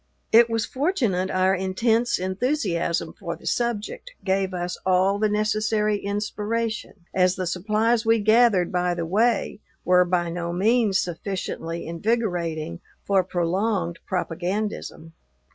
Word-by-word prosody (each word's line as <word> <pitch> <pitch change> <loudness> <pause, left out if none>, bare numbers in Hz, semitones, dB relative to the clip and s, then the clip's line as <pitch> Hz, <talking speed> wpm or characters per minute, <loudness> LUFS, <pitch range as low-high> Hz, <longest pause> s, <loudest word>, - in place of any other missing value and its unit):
It 235 +1 +7
was 225 -2 0
fortunate 245 - 0
our 185 +1 +2
intense 220 +6 +1
enthusiasm 185 - -1
for 170 -4 -5
the - - -17
subject 240 - -2
gave 190 -1 0
us 180 0 -3
all 190 +2 +2
the 215 0 +2
necessary 215 0 +1
inspiration, 210 -1 -3
as 185 -1 +3
the 185 - -3
supplies 215 +6 +1
we 225 0 +4
gathered 215 -4 +4
by 180 -1 0
the 170 -1 -3
way 215 +4 +1 0.3
were 180 0 +5
by 175 -1 0
no 170 0 -3
means 210 +2 +2
sufficiently 170 -2 -4
invigorating 170 -4 -2 0.2
for 195 -2 +3
prolonged 180 0 -1
propagandism. 180 -1 -3
195 Hz, 125 wpm, -24 LUFS, 180-220 Hz, 0.3 s, It